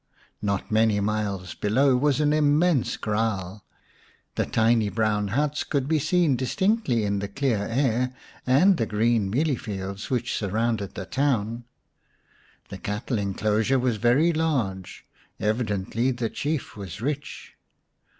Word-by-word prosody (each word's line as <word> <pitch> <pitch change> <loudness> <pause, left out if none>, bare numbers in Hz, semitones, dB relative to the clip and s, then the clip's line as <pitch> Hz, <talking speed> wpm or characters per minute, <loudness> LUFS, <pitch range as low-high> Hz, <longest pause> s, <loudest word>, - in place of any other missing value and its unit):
Not 100 0 -2
many 110 -1 +3
miles 100 -3 -2
below 130 +6 +2
was 140 +2 +2
an 150 0 +3
immense 150 -1 +2
kraal; 105 -3 -2 0.7
the - - -1
tiny 110 -1 +2
brown 105 0 0
huts 145 +8 0
could 140 -3 -1
be 160 0 +2
seen 155 -1 +2
distinctly 135 - +1
in 100 0 0
the 100 - -3
clear 120 +1 0
air, 125 0 +1 0.4
and 175 +9 +5
the 115 - 0
green 110 -1 +1
mealie 140 +6 +1
fields 100 -2 -5
which 120 -2 -1
surrounded 110 0 -1
the 95 - -5
town. 120 -3 -1 1.0
The - - -8
cattle 105 +3 -3
enclosure 105 +5 +1
was 125 -3 0
very 135 +10 +3
large; 125 - -2 0.3
evidently 110 +1 0
the 120 -3 -2
Chief 150 -1 -3
was 100 -5 -7
rich. 145 +4 -5
115 Hz, 130 wpm, -25 LUFS, 105-140 Hz, 1.0 s, and